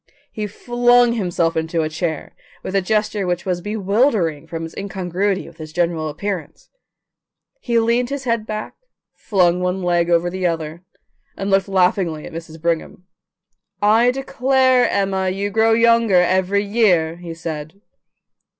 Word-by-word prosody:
He 210 Hz, -2 st, -4 dB
flung 240 Hz, +2 st, +3 dB
himself 175 Hz, -6 st, 0 dB
into 160 Hz, 0 st, -1 dB
a -, -, -1 dB
chair 160 Hz, 0 st, -4 dB, 0.3 s
with -, -, -5 dB
a 195 Hz, -, +3 dB
gesture 210 Hz, 0 st, -1 dB
which 175 Hz, -1 st, -2 dB
was 180 Hz, -2 st, -1 dB
bewildering 205 Hz, -, 0 dB
from 165 Hz, -1 st, -5 dB
its 165 Hz, -, -10 dB
incongruity 195 Hz, 0 st, -2 dB
with -, -, -15 dB
his 155 Hz, -1 st, -9 dB
general 170 Hz, -2 st, -1 dB
appearance. 175 Hz, -1 st, -6 dB, 0.9 s
He 235 Hz, -, -1 dB
leaned 235 Hz, +2 st, +2 dB
his 280 Hz, -1 st, -4 dB
head 230 Hz, -3 st, -1 dB
back, 215 Hz, 0 st, -5 dB, 0.4 s
flung 180 Hz, -3 st, +1 dB
one 180 Hz, +1 st, -1 dB
leg 175 Hz, -1 st, +1 dB
over 175 Hz, +1 st, +2 dB
the 185 Hz, 0 st, -1 dB
other, 165 Hz, 0 st, -4 dB, 0.6 s
and 195 Hz, 0 st, -3 dB
looked 195 Hz, 0 st, +3 dB
laughingly 180 Hz, -4 st, +1 dB
at -, -, -10 dB
Mrs. 165 Hz, -1 st, -8 dB
Brigham. 170 Hz, +2 st, -2 dB, 0.7 s
"I 220 Hz, +4 st, +4 dB
declare, 260 Hz, -1 st, +2 dB
Emma, 190 Hz, -1 st, 0 dB
you 200 Hz, +2 st, -2 dB
grow 225 Hz, +2 st, +3 dB
younger 230 Hz, -2 st, +4 dB
every 190 Hz, +3 st, +2 dB
year," 190 Hz, -7 st, +2 dB
he 170 Hz, -1 st, -8 dB
said. 160 Hz, +1 st, -6 dB
190 Hz, 150 wpm, -20 LUFS, 170-220 Hz, 0.9 s, I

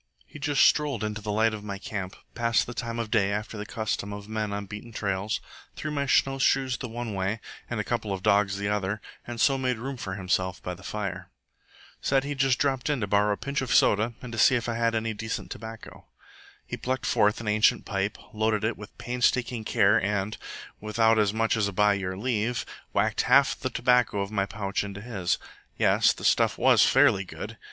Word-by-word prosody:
He -, -, -12 dB
just 145 Hz, -1 st, +3 dB
strolled 145 Hz, -7 st, +2 dB
into 105 Hz, 0 st, -3 dB
the 105 Hz, 0 st, -3 dB
light 110 Hz, +1 st, +2 dB
of 105 Hz, -1 st, -6 dB
my 100 Hz, -1 st, -5 dB
camp, 95 Hz, -1 st, -5 dB, 0.2 s
passed 115 Hz, -1 st, +2 dB
the 120 Hz, -, -7 dB
time 115 Hz, -1 st, -4 dB
of 115 Hz, -2 st, -3 dB
day 100 Hz, -4 st, +3 dB
after 105 Hz, +2 st, -3 dB
the 105 Hz, 0 st, -6 dB
custom 110 Hz, -3 st, -3 dB
of 100 Hz, 0 st, -8 dB
men 110 Hz, -1 st, -2 dB
on 100 Hz, 0 st, -3 dB
beaten 105 Hz, +4 st, -9 dB
trails, 100 Hz, -1 st, -2 dB, 0.4 s
threw 155 Hz, -, -4 dB
my 140 Hz, -1 st, -1 dB
snowshoes 135 Hz, -1 st, +2 dB
the 125 Hz, -, -5 dB
one 115 Hz, -1 st, -5 dB
way 95 Hz, +3 st, -1 dB, 0.3 s
and -, -, -2 dB
a -, -, 0 dB
couple 105 Hz, -, -2 dB
of 95 Hz, -1 st, -4 dB
dogs 100 Hz, -1 st, +3 dB
the 100 Hz, 0 st, -2 dB
other, 105 Hz, 0 st, -1 dB, 0.3 s
and 120 Hz, -1 st, -6 dB
so 135 Hz, +3 st, +3 dB
made 125 Hz, -2 st, 0 dB
room 130 Hz, +3 st, -5 dB
for 95 Hz, -5 st, -5 dB
himself 95 Hz, -1 st, -1 dB
by 90 Hz, -, -3 dB
the 90 Hz, -, -12 dB
fire. 100 Hz, 0 st, -5 dB, 0.7 s
Said 135 Hz, -1 st, +2 dB
he'd 140 Hz, -1 st, -4 dB
just 130 Hz, -1 st, +3 dB
dropped 135 Hz, +1 st, 0 dB
in 145 Hz, -3 st, +1 dB
to -, -, +1 dB
borrow 105 Hz, +1 st, +2 dB
a -, -, -4 dB
pinch 140 Hz, 0 st, -2 dB
of 130 Hz, -, -3 dB
soda 110 Hz, +3 st, +4 dB
and 125 Hz, -, -7 dB
to 110 Hz, -, -3 dB
see 130 Hz, -, +6 dB
if 120 Hz, -1 st, -1 dB
I 120 Hz, -, -1 dB
had 115 Hz, 0 st, +1 dB
any 110 Hz, 0 st, -1 dB
decent 110 Hz, +1 st, -5 dB
tobacco. 115 Hz, 0 st, -9 dB, 0.6 s
He -, -, -5 dB
plucked 130 Hz, 0 st, -2 dB
forth 105 Hz, 0 st, +3 dB
an 115 Hz, -, -7 dB
ancient 105 Hz, +1 st, +3 dB
pipe, 100 Hz, +1 st, -2 dB, 0.2 s
loaded 110 Hz, -1 st, +1 dB
it 110 Hz, +1 st, 0 dB
with 105 Hz, -1 st, -12 dB
painstaking 125 Hz, -1 st, 0 dB
care, 110 Hz, 0 st, +3 dB
and, 105 Hz, +1 st, -1 dB, 0.4 s
without 110 Hz, +1 st, +2 dB
as 105 Hz, -2 st, +3 dB
much 115 Hz, +1 st, +1 dB
as 105 Hz, -2 st, +1 dB
by 105 Hz, +1 st, +3 dB
your 95 Hz, -2 st, -3 dB
leave, 120 Hz, +1 st, -1 dB, 0.3 s
whacked -, -, +1 dB
half -, -, +5 dB
the -, -, -3 dB
tobacco 125 Hz, -5 st, +2 dB
of 100 Hz, +1 st, -4 dB
my 100 Hz, -2 st, 0 dB
pouch 100 Hz, 0 st, -2 dB
into 100 Hz, -1 st, -7 dB
his. 100 Hz, -6 st, -1 dB, 0.4 s
Yes, -, -, +4 dB
the -, -, -6 dB
stuff -, -, +3 dB
was -, -, +5 dB
fairly 95 Hz, -, +4 dB
good. 95 Hz, -, -8 dB
110 Hz, 210 wpm, -27 LUFS, 100-120 Hz, 0.7 s, see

